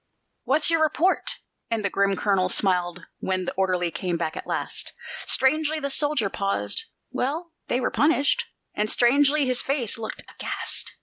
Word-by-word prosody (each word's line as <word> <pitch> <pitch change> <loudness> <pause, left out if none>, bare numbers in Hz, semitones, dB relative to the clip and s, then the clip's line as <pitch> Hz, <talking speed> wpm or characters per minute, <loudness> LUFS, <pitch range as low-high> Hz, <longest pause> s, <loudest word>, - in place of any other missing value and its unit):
"What's 300 +5 +2
your 330 -1 +3
report?" 315 +4 +2 0.3
and 225 -3 -1
the - - +2
grim 200 0 +2
colonel 190 -2 +1
smiled 180 -2 +1
when 185 -1 -1
the - - -3
orderly 180 -2 0
came 170 +1 -2
back 160 -1 -2
at - - -7
last. - - -3 0.3
Strangely 310 +3 +2
the 280 -1 -2
soldier 290 -6 +1
paused: 195 - -2 0.3
"Well, 320 +7 -2 0.2
they 245 - +1
were 255 - 0
punished." 310 - +2 0.3
And 210 +1 0
strangely 280 +5 +4
his 255 0 +2
face 265 -6 0
looked, 220 - -6
aghast. - - -2
240 Hz, 160 wpm, -25 LUFS, 190-290 Hz, 0.3 s, strangely